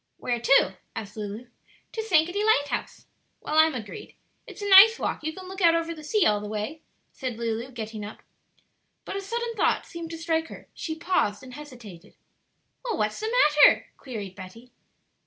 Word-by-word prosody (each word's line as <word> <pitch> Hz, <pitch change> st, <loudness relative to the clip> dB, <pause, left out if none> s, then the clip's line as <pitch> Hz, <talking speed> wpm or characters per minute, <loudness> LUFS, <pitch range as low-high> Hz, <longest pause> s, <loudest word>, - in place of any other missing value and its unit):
"Where 240 Hz, -1 st, -2 dB
to?" 195 Hz, -7 st, +4 dB, 0.2 s
asked 210 Hz, -2 st, -7 dB
Lulu. 210 Hz, +2 st, -6 dB, 0.5 s
"To 445 Hz, -, -3 dB
Sankaty 360 Hz, -1 st, +2 dB
Lighthouse." 360 Hz, -10 st, 0 dB, 0.3 s
"Well, 305 Hz, +1 st, 0 dB
I'm 315 Hz, -2 st, +5 dB
agreed; 215 Hz, -4 st, -8 dB, 0.3 s
it's 415 Hz, -, -9 dB
a -, -, -2 dB
nice 405 Hz, +4 st, +9 dB
walk; -, -, -3 dB
you 315 Hz, -, -2 dB
can 370 Hz, +3 st, -10 dB
look 380 Hz, +1 st, -7 dB
out 335 Hz, -1 st, +5 dB
over 335 Hz, 0 st, -1 dB
the 310 Hz, -2 st, -11 dB
sea 405 Hz, +5 st, +2 dB
all 210 Hz, -1 st, +2 dB
the 210 Hz, -, -6 dB
way," 215 Hz, +9 st, -4 dB, 0.3 s
said 255 Hz, -4 st, -5 dB
Lulu, 230 Hz, +1 st, -3 dB
getting 220 Hz, -3 st, -7 dB
up. 205 Hz, -, -9 dB, 0.8 s
But -, -, -5 dB
a -, -, -3 dB
sudden 465 Hz, +4 st, -3 dB
thought 440 Hz, -, +1 dB
seemed 335 Hz, -1 st, -8 dB
to 330 Hz, -, -6 dB
strike 325 Hz, -1 st, -1 dB
her; -, -, -12 dB
she 320 Hz, -, -5 dB
paused 315 Hz, -, 0 dB
and 255 Hz, -1 st, -11 dB
hesitated. 235 Hz, -, -12 dB, 0.7 s
"Well, 475 Hz, -3 st, -2 dB
what's 210 Hz, 0 st, -1 dB
the 440 Hz, +1 st, -3 dB, 0.4 s
matter?" -, -, +2 dB
queried 215 Hz, -8 st, -7 dB
Betty. 225 Hz, +7 st, -12 dB
295 Hz, 180 wpm, -26 LUFS, 220-350 Hz, 0.8 s, nice